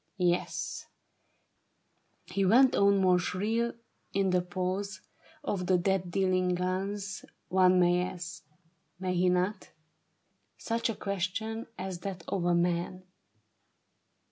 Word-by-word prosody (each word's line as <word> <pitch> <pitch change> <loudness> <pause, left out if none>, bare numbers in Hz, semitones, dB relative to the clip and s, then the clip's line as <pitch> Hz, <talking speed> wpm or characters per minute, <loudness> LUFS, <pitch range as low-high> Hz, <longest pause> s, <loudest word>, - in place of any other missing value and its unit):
Yes," 180 -1 -1 1.4
he 195 - -1
went 250 +7 +6
on 200 0 +4
more 180 -1 +4
shrill, 215 +7 -1 0.4
"in 195 -1 +2
the 180 0 +3
pause 185 +2 -3 0.4
Of 185 -9 -2
the 185 - +4
death 185 0 0
dealing 185 -1 +1
guns 190 +2 -3 0.3
one 185 0 +5
may 175 0 +4
ask 170 -3 -7 0.3
— 170 +1 -45
may 185 -1 -1
he 180 0 +3
not 185 +3 0 0.5
?— - - -46
Such 230 +1 -1
a 225 - -2
question 205 +4 -3
as 185 -1 -5
that 185 -1 -6
of 180 -3 -1
a 175 0 +3
man." 175 +1 0
185 Hz, 125 wpm, -30 LUFS, 180-200 Hz, 1.4 s, went